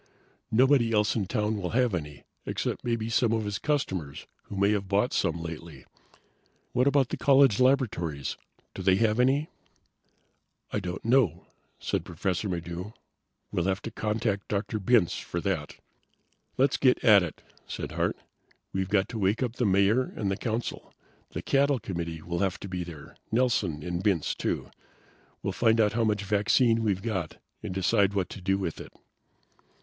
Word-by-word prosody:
Nobody 125 Hz, 0 st, +4 dB
else 105 Hz, -1 st, +2 dB
in 105 Hz, -5 st, -1 dB
town 105 Hz, -1 st, 0 dB
will 90 Hz, -3 st, -3 dB
have 125 Hz, -4 st, +2 dB
any, 75 Hz, -4 st, -5 dB, 0.2 s
except -, -, -2 dB
maybe 115 Hz, -2 st, -1 dB
some 115 Hz, 0 st, +2 dB
of 110 Hz, -2 st, 0 dB
his 105 Hz, 0 st, -3 dB
customers 95 Hz, -, -2 dB, 0.2 s
who -, -, -8 dB
may 100 Hz, +1 st, +3 dB
have 100 Hz, -2 st, -1 dB
bought 100 Hz, +6 st, +1 dB
some 85 Hz, +1 st, 0 dB
lately. 85 Hz, 0 st, -8 dB, 0.9 s
What 125 Hz, +3 st, +2 dB
about 140 Hz, -3 st, +3 dB
the -, -, -3 dB
college 135 Hz, -6 st, +5 dB
laboratories? 105 Hz, -, +1 dB, 0.4 s
Do -, -, -6 dB
they 95 Hz, 0 st, +4 dB
have 110 Hz, +2 st, +2 dB
any?" 135 Hz, +5 st, +3 dB, 1.2 s
"I -, -, 0 dB
don't 90 Hz, +1 st, -6 dB
know," 115 Hz, -, +2 dB, 0.3 s
said -, -, -2 dB
Professor 95 Hz, +2 st, -2 dB
Maddox. 85 Hz, +3 st, -5 dB, 0.6 s
"We'll 85 Hz, -, 0 dB
have 95 Hz, 0 st, 0 dB
to 115 Hz, -, -5 dB
contact 105 Hz, -2 st, -1 dB
Dr. 105 Hz, +1 st, -2 dB
Bintz 105 Hz, -3 st, +3 dB
for 85 Hz, -, -4 dB
that." 85 Hz, -6 st, -2 dB, 0.8 s
"Let's 135 Hz, +1 st, +3 dB
get 130 Hz, -2 st, +3 dB
at 105 Hz, -4 st, +7 dB
it," 90 Hz, -4 st, -6 dB, 0.2 s
said -, -, -5 dB
Hart. -, -, -1 dB, 0.6 s
"We've 95 Hz, 0 st, -1 dB
got 100 Hz, -1 st, +2 dB
to 115 Hz, -, -5 dB
wake 100 Hz, +5 st, +1 dB
up 120 Hz, -1 st, -3 dB
the 120 Hz, -, +2 dB
Mayor 100 Hz, +6 st, +3 dB
and 100 Hz, -2 st, -1 dB
the -, -, 0 dB
Council. 115 Hz, +2 st, -4 dB, 0.3 s
The -, -, -6 dB
cattle 140 Hz, 0 st, +3 dB
committee 85 Hz, -6 st, -5 dB
will 85 Hz, 0 st, -3 dB
have 95 Hz, -1 st, 0 dB
to -, -, -6 dB
be 90 Hz, -1 st, -3 dB
there. 80 Hz, -4 st, -11 dB
Nelson 110 Hz, -10 st, +1 dB
and 90 Hz, +2 st, -3 dB
Bintz, 95 Hz, -7 st, +1 dB
too. -, -, -3 dB, 0.7 s
We'll -, -, -1 dB
find 115 Hz, -1 st, +3 dB
out 105 Hz, -1 st, +3 dB
how 115 Hz, 0 st, +1 dB
much 105 Hz, -1 st, 0 dB
vaccine 110 Hz, +3 st, +3 dB
we've 100 Hz, -4 st, 0 dB
got 95 Hz, -8 st, -3 dB, 0.2 s
and -, -, -5 dB
decide 95 Hz, +2 st, +2 dB
what 95 Hz, -3 st, 0 dB
to 100 Hz, -, -9 dB
do 95 Hz, +1 st, +1 dB
with 95 Hz, -5 st, -4 dB
it." -, -, -11 dB
100 Hz, 170 wpm, -28 LUFS, 90-115 Hz, 1.2 s, at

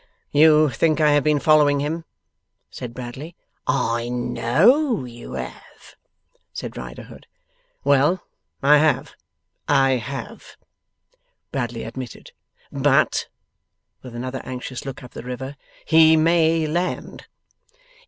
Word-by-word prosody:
'You 155 Hz, 0 st, +5 dB
think 155 Hz, +4 st, +1 dB
I 150 Hz, -1 st, +4 dB
have 145 Hz, -1 st, +3 dB
been 150 Hz, -1 st, +3 dB
following 145 Hz, -1 st, +4 dB
him?' 160 Hz, +3 st, -3 dB, 0.7 s
said 125 Hz, -, -7 dB
Bradley. 130 Hz, +7 st, -8 dB, 0.3 s
'I 120 Hz, -4 st, 0 dB
KNOW 130 Hz, -, +2 dB
you 120 Hz, -1 st, -10 dB
have,' -, -, -9 dB, 0.6 s
said -, -, -7 dB
Riderhood. -, -, -10 dB, 0.6 s
'Well! 145 Hz, +6 st, +3 dB, 0.4 s
I 145 Hz, +2 st, +6 dB
have, 155 Hz, 0 st, +1 dB, 0.5 s
I 135 Hz, -2 st, +3 dB
have,' 140 Hz, -, -8 dB, 0.9 s
Bradley 120 Hz, -3 st, -3 dB
admitted. 120 Hz, 0 st, -8 dB, 0.4 s
'But,' -, -, +2 dB, 0.7 s
with 125 Hz, -2 st, -10 dB
another 130 Hz, +2 st, -5 dB
anxious 130 Hz, 0 st, -7 dB
look 135 Hz, -, -7 dB
up 125 Hz, -, -11 dB
the -, -, -8 dB
river, 125 Hz, +3 st, -6 dB, 0.3 s
'he 160 Hz, 0 st, +6 dB
may 165 Hz, 0 st, +3 dB
land. 175 Hz, +4 st, -3 dB
140 Hz, 110 wpm, -22 LUFS, 125-155 Hz, 0.9 s, I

